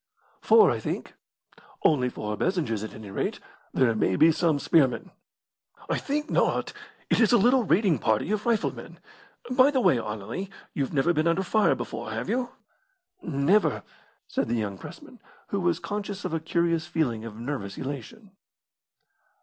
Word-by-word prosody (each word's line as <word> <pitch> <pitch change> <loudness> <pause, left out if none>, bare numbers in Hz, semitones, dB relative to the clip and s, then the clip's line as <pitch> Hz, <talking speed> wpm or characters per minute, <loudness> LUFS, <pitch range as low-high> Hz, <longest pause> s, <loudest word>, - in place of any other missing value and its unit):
"Four, 445 - +6
I - - -2
think." - - -4 0.7
"Only 130 -5 +3
four 105 -3 -4
Bezingers, 150 - -1
at 110 - -7
any 105 -2 -9
rate; - - -2 0.3
there 125 -3 +2
may 95 -4 +1
be 160 - +6
some 160 -1 +1
spearmen." 135 -5 +2 0.8
"I - - +1
think 300 +2 -2
not; - - 0 0.4
it - - +3
is 225 -4 +4
a 240 - +6
little 245 +4 +4
raiding 190 - +3
party 110 - 0
of 215 +1 -1
rifle 230 -3 +1
men. - - -11 0.5
By 255 +2 +5
the 275 -3 +1
way, 135 - +3
Anerley, 110 - -5 0.2
you've 140 -2 -2
never 145 +5 +2
been 155 +1 +1
under 170 +3 +2
fire 215 +4 +3
before, - - -6
have - - -4
you?" 250 0 0 0.7
"Never," 165 +7 +1 0.4
said - - -1
the 120 - 0
young 100 -4 -3
pressman, 295 -5 -12 0.3
who 200 - -1
was 175 -2 +1
conscious 205 +1 -5
of - - -3
a 165 - 0
curious 170 +1 0
feeling 140 -10 -1
of 110 -2 -8
nervous 115 -6 -5
elation. 170 - -7
165 Hz, 165 wpm, -26 LUFS, -, 0.8 s, Four